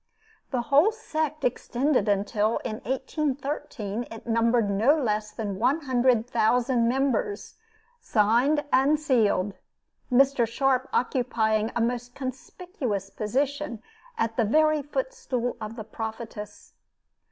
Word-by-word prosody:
The 250 -3 -1
whole 290 - +4
sect 310 -8 -3
extended 250 -1 +1
until, 205 +2 +1
in 215 - -3
1813, 265 -4 -3
it 225 - -10
numbered 230 -1 +2
no 215 +9 +3
less 215 -6 -1
than 205 -3 -5
one 265 +8 +2
hundred 250 -4 +2
thousand 240 +1 +2
members, 270 - -1 0.4
signed 245 - +2
and 285 +3 +4
"sealed" 215 -9 +2 0.6
Mr. 265 -1 +4
Sharp 260 +2 +1
occupying 225 -4 +1
a 235 - +1
most 245 +1 -2
conspicuous 260 - -5
position 260 +1 -2 0.3
at 225 - -1
the 235 - +3
very 310 +6 +3
footstool 280 - -3
of 215 +1 -6
the 220 - -6
Prophetess. 220 -1 -7
245 Hz, 115 wpm, -26 LUFS, 220-275 Hz, 0.6 s, whole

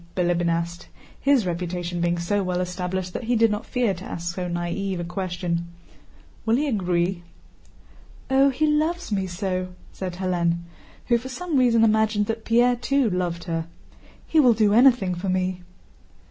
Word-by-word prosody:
Bilíbin 175 -1 +1
asked, 170 +1 -2 0.3
his 275 -6 +3
reputation 175 0 -3
being 175 0 +1
so 185 +4 0
well 180 -1 -1
established 180 0 -3
that 240 - -4
he 240 +1 +1
did 225 -1 +4
not 210 +1 -3
fear 245 -5 +1
to 185 +1 -9
ask 175 -3 -4
so 180 0 -4
naïve 175 +3 -2
a - - -2
question. 175 -1 -3 0.8
"Will 225 +1 +2
he 295 +4 +1
agree?" 180 -5 0 1.1
"Oh, 270 +1 +4
he 275 +4 0
loves 310 +1 0
me 195 -2 0
so!" 185 0 -3 0.2
said 185 -2 -5
Hélène, 175 -2 0 0.4
who 235 -1 +3
for 255 +3 -8
some 330 +5 -4
reason 240 -3 +4
imagined 215 -1 +3
that 225 +1 -4
Pierre 240 +2 +4
too 255 -1 +1
loved 175 -2 -2
her. 165 -2 -3 0.6
"He 320 - +2
will 250 -6 +6
do 210 -2 +3
anything 235 -6 +5
for 180 +2 -3
me." 185 0 -1
190 Hz, 165 wpm, -24 LUFS, 175-230 Hz, 1.1 s, will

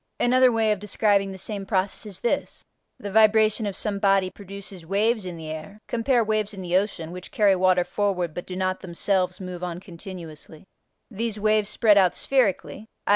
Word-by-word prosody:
Another 255 +1 +5
way 225 -2 +2
of 210 - 0
describing 205 -1 +1
the 190 - -8
same 200 +1 -5
process 195 +2 -1
is 195 -3 -9
this: 240 - -2 0.3
the 205 - -7
vibration 215 0 +4
of 200 - -4
some 205 -2 -2
body 195 -2 +2
produces 200 -2 -9
waves 205 +3 0
in 175 -2 -6
the 160 -1 -7
air 160 +6 -8
(cf. 235 0 +1
waves 215 -1 -1
in 190 - -7
the 175 0 -1
ocean, 185 -4 0
which 180 +1 -9
carry 205 -3 +3
water 185 -1 +3
forward 180 -5 -1
but 175 - -7
do 185 - -6
not 185 0 -1
themselves 185 +1 -1
move 180 -2 -7
on 175 -1 -4
continuously), 170 -4 -10 0.5
these 220 0 -3
waves 215 -1 +2
spread 210 -2 +4
out 185 -2 +3
spherically 225 -4 0 0.2
(i. - - -5
195 Hz, 185 wpm, -24 LUFS, 180-215 Hz, 0.5 s, Another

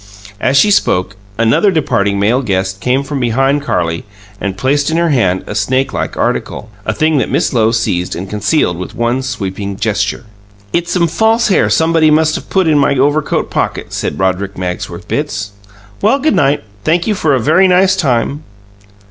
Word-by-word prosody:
As 135 - +2
she 210 +7 +4
spoke, 95 - +1 0.2
another 115 - +3
departing 100 - 0
male 115 +6 +2
guest 95 -4 -2
came 130 +2 +1
from 140 0 -4
behind 135 +4 +1
Carlie 85 - -1 0.4
and 100 -1 -3
placed 140 +5 +1
in 160 - 0
her 170 0 +2
hand 95 - +1
a - - -6
snakelike 130 +6 -1
article 110 - -2 0.2
a - - +2
thing 155 -2 +2
that - - -1
Miss - - 0
Lowe 110 -2 +3
seized 90 -6 -1
and 95 +3 -5
concealed 105 - 0
with 90 - -7
one 120 +2 0
sweeping 100 -6 -4
gesture. 105 0 -1 0.5
"It's 170 0 -1
some 170 -2 +2
false 220 +7 +2
hair 195 - +3
somebody 160 -1 +3
must 155 0 +3
of - - -7
put 190 -2 +2
in 155 -2 +3
my 140 0 +2
overcoat 145 +3 0
pocket," - - -2
said 75 - -3
Roderick 95 +2 -1
Magsworth 90 -1 -5
Bitts. 100 +1 -3 0.5
"Well, 275 - +3
'g 310 +3 +1
night. 140 +1 +1 0.2
Thank 170 +2 +1
you 220 - +1
for 155 -7 +1
a - - +1
very 160 +10 +4
nice 185 +1 +4
time." 140 -4 0
130 Hz, 180 wpm, -14 LUFS, 100-160 Hz, 0.5 s, she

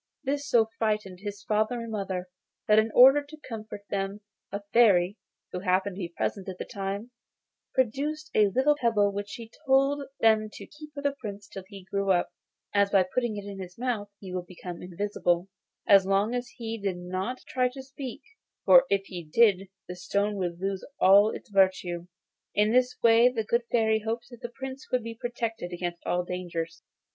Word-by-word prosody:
This 285 +1 -2
so 230 -2 +5
frightened 210 -4 -1
his 205 0 -7
father 215 +3 +1
and 230 -1 -6
mother 190 -4 -3 0.4
that 215 0 +6
in 220 +1 +2
order 270 +4 +8
to 300 +2 -13
comfort 215 -3 -7
them 195 +1 -2 0.3
a 200 +1 -4
Fairy, 200 -5 +5 0.4
who 180 - -3
happened 185 +1 +1
to - - -6
be 175 -3 -3
present 190 +3 -3
at 185 - -7
the - - -5
time, 200 +4 -5 0.6
produced 290 +5 -1
a 210 -1 +5
little 265 +9 +3
pebble 225 -7 +2
which 205 0 -5
she 230 0 -8 0.2
told 275 +1 +3
them 220 -1 +4
to - - -9
keep 300 0 -13
for 285 - -6
the 285 - +2
Prince 205 -4 -7
till 195 -2 -9
he 195 -2 -11
grew 195 +1 -2
up, 175 -2 +2 0.4
as 200 -1 +4
by 195 -2 +5
putting 240 -4 0
it 200 - -6
in 200 -1 -7
his 180 -1 -8
mouth 230 -4 -2
he 190 -2 -8
would 180 -1 -4
become 180 -1 -8
invisible, 180 -1 -1 0.4
as 195 -1 +7
long 195 +4 +1
as 245 0 -3
he 225 -2 -5
did 195 -3 -2
not 185 +7 -4
try 255 -1 +1
to 265 +1 -9
speak, 270 0 -8 0.4
for 265 0 +8
if 200 -1 +2
he 180 -3 -7
did 195 +3 +3 0.2
the 180 - -6
stone 200 +3 -1
would 175 -2 -3
lose 195 0 -2 0.2
all 200 +3 +7
its 220 - -8
virtue. 185 -3 +2 0.5
In 210 +1 +3
this 250 +1 +2
way 230 +1 +7
the 230 -3 -2
good 235 +2 0
fairy 220 -2 +3
hoped 230 +3 -4
that 240 0 -12
the 240 - -5
Prince 265 +2 -8
would 250 -2 +1
be 230 0 -5
protected 225 -5 -4
against 175 -1 -4
all 180 0 +1
dangers. 170 -2 -5
205 Hz, 190 wpm, -28 LUFS, 190-240 Hz, 0.6 s, order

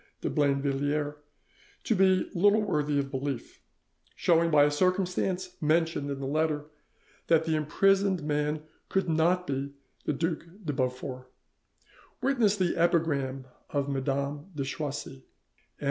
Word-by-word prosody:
de - - -2
Blainvilliers 145 +1 +1 0.7
to 235 - +1
be 190 -2 +3
little 205 +4 +4
worthy 150 -7 0
of 140 -1 -1
belief, 135 -2 -4 0.5
showing 170 -1 +3
by 150 -2 +6
a 145 - +3
circumstance 185 +2 0
mentioned 160 -1 +1
in 140 -1 -3
the 135 - -4
letter 150 +1 0 0.6
that 160 -1 +4
the 160 -1 +1
imprisoned 190 +4 +2
man 150 +1 -1 0.3
could 195 -1 +1
not 170 +3 +2
be 140 -1 -3 0.3
the - - +1
Duc 165 +3 -1 0.2
de 150 - -1
Beaufort; 130 -1 -3 0.9
witness 245 -6 +2
the 185 -3 +1
epigram 145 -6 +1 0.2
of 140 -1 -1
Madame 140 +2 -2
de 140 - -1
Choisy, 145 - -4
"M. - - -20
150 Hz, 130 wpm, -29 LUFS, 140-180 Hz, 0.9 s, by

